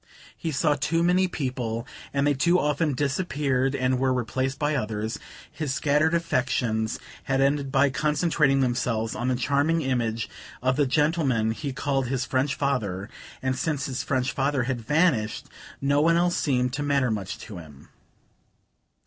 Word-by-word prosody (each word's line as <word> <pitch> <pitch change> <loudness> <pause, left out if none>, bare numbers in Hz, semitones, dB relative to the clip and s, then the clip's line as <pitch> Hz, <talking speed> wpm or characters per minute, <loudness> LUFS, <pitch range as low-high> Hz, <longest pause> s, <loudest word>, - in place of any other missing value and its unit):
He 165 - -3
saw 150 +1 +2
too 165 +4 0
many 180 +2 +3
people, 125 -7 -3 0.3
and 140 0 +1
they 145 - +3
too 170 +6 +3
often 150 0 +1
disappeared 140 -2 0
and 130 -1 +1
were 130 0 +2
replaced 130 +2 -1
by 150 0 0
others: 110 -4 -2 0.3
his 150 -2 -3
scattered 155 +3 +2
affections 125 -8 0 0.3
had 135 -1 +1
ended 140 0 +1
by 140 0 +3
concentrating 150 0 +2
themselves 120 -3 0
on 120 - -3
the 130 - +2
charming 145 +6 +1
image 115 -4 -1 0.3
of 130 +1 +1
the 145 -1 +2
gentleman 140 -6 +2
he 140 +5 -4
called 135 0 -1
his 130 0 -1
French 135 +3 0
father; 110 -8 -2 0.3
and 130 0 0
since 145 -1 -1
his 130 -2 -3
French 130 -2 0
father 135 -1 0
had 125 -1 -2
vanished 140 -5 +1 0.4
no 140 +1 +3
one 165 +2 +4
else 175 0 +2
seemed 125 -3 +1
to 140 - -2
matter 140 -4 +1
much 100 -3 -3
to 100 -5 -9
him. 75 -4 -14
135 Hz, 160 wpm, -26 LUFS, 125-150 Hz, 0.4 s, one